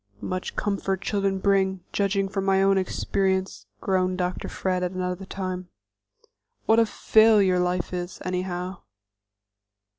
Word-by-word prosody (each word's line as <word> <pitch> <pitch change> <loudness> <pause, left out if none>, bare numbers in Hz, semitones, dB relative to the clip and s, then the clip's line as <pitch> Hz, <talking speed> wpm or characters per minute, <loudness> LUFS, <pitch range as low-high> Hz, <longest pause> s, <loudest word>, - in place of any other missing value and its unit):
"Much 185 0 -4
comfort 195 -2 -1
children 195 -1 0
bring, 190 -1 +1
judging 195 -1 +1
from 195 0 -3
my 195 0 +3
own 195 0 +4
experience," 190 - -1
groaned 185 -1 +1
Dr. 180 0 -2
Fred 185 -1 -1
at 180 0 -2
another 185 +1 -3
time. 185 -2 -4 1.0
"What 225 +1 +5
a 230 - +4
failure 210 -4 +4
life 180 0 -1
is, 180 0 -4
anyhow!" 180 0 -3
190 Hz, 125 wpm, -25 LUFS, 180-195 Hz, 1.0 s, What